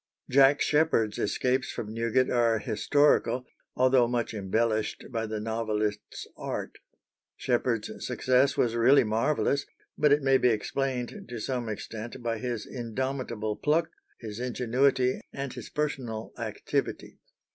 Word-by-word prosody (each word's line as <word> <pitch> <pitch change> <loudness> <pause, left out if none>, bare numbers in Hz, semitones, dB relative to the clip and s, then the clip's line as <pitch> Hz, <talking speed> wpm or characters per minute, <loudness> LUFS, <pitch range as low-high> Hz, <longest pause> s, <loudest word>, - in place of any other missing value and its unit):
Jack 135 +2 +6
Sheppard's 150 -9 +2
escapes 130 +5 0
from 110 -1 -5
Newgate 115 +3 +1
are 115 -2 +3
historical, 125 +4 +2 0.3
although 130 -1 +4
much 120 -1 -1
embellished 110 +2 -1
by 115 -2 -2
the 110 0 -3
novelist's 110 -1 -2
art. - - -5 0.6
Sheppard's - - -1
success 130 +2 +2
was 115 -2 +2
really 125 +5 +5
marvellous, 140 +6 0 0.3
but 150 -1 +4
it 145 0 +4
may 135 -1 +4
be 125 - +4
explained 125 +3 -2
to 120 -1 -5
some 120 0 -3
extent 110 +3 -6
by 115 -1 -1
his 120 -3 -3
indomitable 120 -3 -3
pluck, 155 +3 +1 0.3
his 110 -1 -7
ingenuity, 125 +1 +1
and 140 -2 -4
his 125 -3 -8
personal 130 -7 -3
activity. - - -3
120 Hz, 125 wpm, -28 LUFS, 110-135 Hz, 0.6 s, Jack